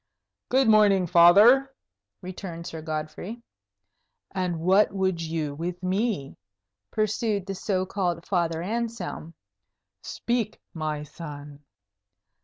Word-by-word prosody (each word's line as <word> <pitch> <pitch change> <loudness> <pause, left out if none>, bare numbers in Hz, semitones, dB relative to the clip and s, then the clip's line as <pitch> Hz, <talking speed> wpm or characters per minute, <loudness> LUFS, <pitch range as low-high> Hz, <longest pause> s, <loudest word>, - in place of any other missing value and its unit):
"Good 260 0 +3
morning, 205 -4 +5
Father," 205 +11 +6 0.5
returned 180 -2 -7
Sir 160 -2 -6
Godfrey. 155 +9 -5 0.9
"And 180 -3 -2
what 190 +5 +4
would 190 -3 -1
you 160 -3 -3
with 175 +4 -5
me?" 190 - -1 0.5
pursued 215 -2 -1
the 195 - -4
so 190 -1 -1
called 180 -3 -2
Father 170 -3 0
Anselm. 225 -5 -4 0.7
"Speak, 235 -3 -2
my 155 -2 -3
son." 145 -2 -10
185 Hz, 100 wpm, -26 LUFS, 165-210 Hz, 0.9 s, Father